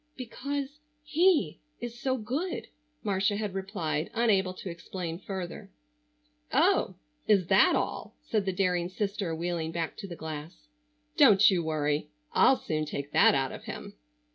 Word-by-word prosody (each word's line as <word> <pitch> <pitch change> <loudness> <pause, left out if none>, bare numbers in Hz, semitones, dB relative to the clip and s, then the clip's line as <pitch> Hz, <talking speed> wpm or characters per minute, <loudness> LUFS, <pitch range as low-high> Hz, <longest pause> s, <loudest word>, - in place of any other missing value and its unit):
"Because 280 +3 -4 0.2
he 300 - +2 0.2
is 240 0 -6
so 260 -1 0
good," 275 - -3 0.4
Marcia 195 0 +1
had 210 -2 -3
replied, 190 -5 -2
unable 195 -5 +2
to 190 - -8
explain 170 0 -6
further. 190 -3 -6 0.8
"Oh, - - +3 0.3
is 200 -4 +4
that 190 0 +6
all?" - - -3
said 215 -3 0
the 190 - +1
daring 180 -2 0
sister, 195 -3 -2
wheeling 165 -1 -2
back 165 -1 -3
to 195 - -7
the 175 - -7
glass. 150 - -8 0.5
"Don't 200 +1 +7
you 175 -3 +1
worry; 150 -1 -1 0.2
I'll 265 - +5
soon 155 -1 -2
take 145 -1 -5
that - - +6
out 135 -1 0
of - - -9
him." - - -7
190 Hz, 145 wpm, -29 LUFS, 165-215 Hz, 0.8 s, Don't